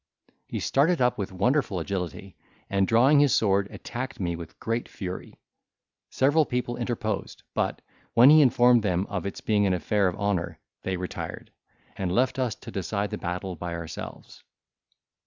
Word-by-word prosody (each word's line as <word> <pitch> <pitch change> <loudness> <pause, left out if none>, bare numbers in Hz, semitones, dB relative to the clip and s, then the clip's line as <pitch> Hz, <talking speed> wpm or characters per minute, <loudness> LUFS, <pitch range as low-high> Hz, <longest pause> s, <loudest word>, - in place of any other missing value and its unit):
He - - -4
started 155 +5 +2
up 125 -2 +2
with 100 0 -3
wonderful 105 +1 +1
agility, 95 +1 -4 0.4
and, 95 -1 +2
drawing 130 +6 +5
his 145 -2 +4
sword, 100 -2 +2
attacked 130 +1 -6
me 85 -3 -1
with 85 -1 -10
great 115 +1 -2
fury. 90 -2 -7 0.7
Several 145 +4 +3
people 125 -3 -2
interposed, 120 -2 -3
but, - - -1 0.3
when 125 +5 +8
he 155 0 +8
informed 120 -2 +5
them 95 -2 0
of 95 -1 -2
its 100 - -6
being 105 -2 +2
an 95 - +2
affair 100 +3 +1
of 90 - -1
honour, 90 -6 -1 0.2
they 95 -1 -2
retired, 90 0 -6 0.4
and 95 -2 -2
left 130 +6 +1
us 125 -4 0
to - - -11
decide 100 +1 -2
the - - -4
battle 90 +1 -4
by 85 0 -5
ourselves. 85 -1 -8
100 Hz, 160 wpm, -26 LUFS, 90-125 Hz, 0.7 s, when